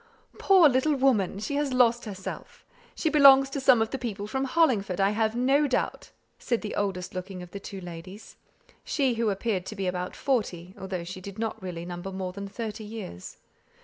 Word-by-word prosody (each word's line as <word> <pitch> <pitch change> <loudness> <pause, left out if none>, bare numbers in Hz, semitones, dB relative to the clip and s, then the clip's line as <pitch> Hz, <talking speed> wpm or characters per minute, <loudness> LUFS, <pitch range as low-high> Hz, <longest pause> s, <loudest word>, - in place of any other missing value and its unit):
"Poor 380 -5 +6
little 280 +3 +2
woman! 245 -9 +2
She 215 +8 -3
has 290 -2 0
lost 240 -1 +3
herself; 190 -3 -8 0.3
she - - -1
belongs 275 -3 +7
to 280 - -2
some 260 -4 +5
of 225 - -6
the 270 - -3
people 215 -5 -4
from 265 +6 -2
Hollingford, 250 - +2
I 195 +1 +3
have 220 +1 0
no 270 +4 +3
doubt," 255 - -2 0.3
said 235 -2 -1
the 210 - -4
oldest 190 -3 -2
looking 185 0 -6
of 175 - -12
the 200 - -6
two 195 0 -8
ladies; 180 +3 -10 0.5
she 270 -4 +1
who 230 -1 0
appeared 195 -2 -2
to 215 - -6
be 195 -1 -3
about 180 0 -3
forty, 190 -9 -2
though 185 -2 -5
she 185 +2 -8
did 200 +2 -9
not 220 -1 -3
really 175 -2 -6
number 175 +2 -6
more 185 -1 -4
than 200 +1 -6
thirty 220 +1 -6
years. 210 - -8
210 Hz, 195 wpm, -27 LUFS, 185-255 Hz, 0.5 s, belongs